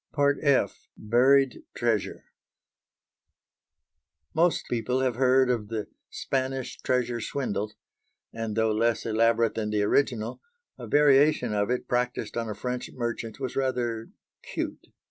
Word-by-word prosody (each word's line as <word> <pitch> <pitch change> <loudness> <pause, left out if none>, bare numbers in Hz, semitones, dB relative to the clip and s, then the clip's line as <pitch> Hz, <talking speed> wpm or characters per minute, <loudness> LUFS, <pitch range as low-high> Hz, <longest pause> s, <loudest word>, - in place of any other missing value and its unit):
F. 140 -3 +1
BURIED 130 +4 +3
TREASURE 115 -4 -1 2.1
Most 170 +2 +2
people 125 +2 -1
have 130 -2 +1
heard 130 +1 +4
of 115 -4 -2
the 110 -1 -4 0.2
"Spanish 130 -1 -3
Treasure 125 -2 0
swindle" 110 -4 -2 0.6
and, 115 -2 -4
though 110 -1 +2
less 115 +1 +1
elaborate 115 0 +2
than 110 -1 -2
the 105 -1 +1
original, 115 0 0 0.4
a - - -7
variation 145 -4 +4
of 105 +1 0
it 125 0 -1
practised 125 0 -1
on 115 -1 -2
a 105 - -4
French 125 +3 -4
merchant 120 -2 -4
was 130 -2 -4
rather 120 -4 -1 0.3
"cute." - - -5
120 Hz, 125 wpm, -27 LUFS, 110-130 Hz, 2.1 s, heard